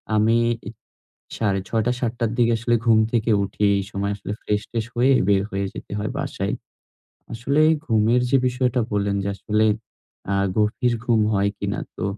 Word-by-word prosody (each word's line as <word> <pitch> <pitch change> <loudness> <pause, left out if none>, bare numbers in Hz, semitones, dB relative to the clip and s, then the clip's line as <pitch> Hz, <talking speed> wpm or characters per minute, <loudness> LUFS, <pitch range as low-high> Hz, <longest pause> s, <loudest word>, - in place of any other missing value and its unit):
আমি 110 +2 +3 1.0
৬ঃ৩০ 100 +1 0
টা 125 - +3
৭ 120 -3 0
টার 115 -2 0
দিকে 120 -1 +4
আসলে 120 +1 +1
ঘুম 110 -1 +6
থেকে 115 -1 +1
উঠি, 100 +1 -5
এই 100 - 0
সময় 100 0 -2
আসলে 100 - -6
ফ্রেশ-ট্রেশ 110 +2 -2
হয়ে 125 +3 +4 0.2
বের 100 -1 +4
হয়ে 100 +1 -2
যেতে - - -9
হয় 105 - -2
বাসায়। - - -3 0.8
আসলে 130 +6 0 0.3
ঘুমের 115 +2 +3
যে 135 - +5
বিষয়টা 125 0 +1
বললেন 100 -1 0
যে 100 - -2
আসলে 105 +2 0 0.7
আ - - +2 0.2
গভীর 120 +4 +1
ঘুম 115 -3 +3
হয় 100 0 +2
কিনা? - - -3 0.2
তো, - - -4
110 Hz, 165 wpm, -22 LUFS, 100-120 Hz, 1.0 s, ঘুম